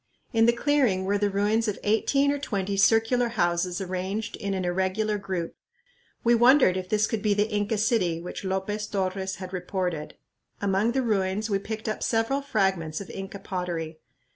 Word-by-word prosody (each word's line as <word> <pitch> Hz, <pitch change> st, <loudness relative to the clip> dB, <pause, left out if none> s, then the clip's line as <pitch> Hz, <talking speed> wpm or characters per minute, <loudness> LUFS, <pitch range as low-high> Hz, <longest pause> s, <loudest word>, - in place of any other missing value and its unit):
In 225 Hz, 0 st, +4 dB
the -, -, +7 dB
clearing 235 Hz, -7 st, +1 dB
were 200 Hz, +1 st, +1 dB
the 205 Hz, 0 st, +2 dB
ruins 210 Hz, +3 st, +1 dB
of 210 Hz, -, -1 dB
eighteen 275 Hz, +7 st, +2 dB
or 285 Hz, -, -2 dB
twenty 200 Hz, -7 st, -2 dB
circular 225 Hz, +5 st, +3 dB
houses 175 Hz, -5 st, 0 dB
arranged 190 Hz, +4 st, -3 dB
in 200 Hz, -1 st, -2 dB
an 185 Hz, -1 st, -2 dB
irregular 190 Hz, +4 st, 0 dB
group. 185 Hz, -4 st, -4 dB, 0.7 s
We 235 Hz, -, +4 dB
wondered 240 Hz, -4 st, +6 dB
if 185 Hz, -1 st, -4 dB
this 215 Hz, 0 st, +3 dB
could 220 Hz, -1 st, -2 dB
be 210 Hz, -1 st, +2 dB
the 205 Hz, +1 st, +2 dB
"Inca 205 Hz, +1 st, 0 dB
city" 200 Hz, -7 st, +1 dB
which 175 Hz, +3 st, -7 dB
Lopez 195 Hz, +2 st, -2 dB
Torres 190 Hz, -1 st, -2 dB
had 185 Hz, 0 st, -8 dB
reported. 180 Hz, -4 st, -3 dB, 0.4 s
Among 200 Hz, +3 st, +1 dB
the 265 Hz, 0 st, +1 dB
ruins 210 Hz, -1 st, 0 dB
we 195 Hz, -, +2 dB
picked 220 Hz, +2 st, -6 dB
up 215 Hz, -, -2 dB
several 230 Hz, +5 st, +1 dB
fragments 190 Hz, -, 0 dB
of 200 Hz, -, -8 dB
Inca 195 Hz, +1 st, -6 dB
pottery. 175 Hz, -5 st, -4 dB
200 Hz, 175 wpm, -26 LUFS, 185-225 Hz, 0.7 s, the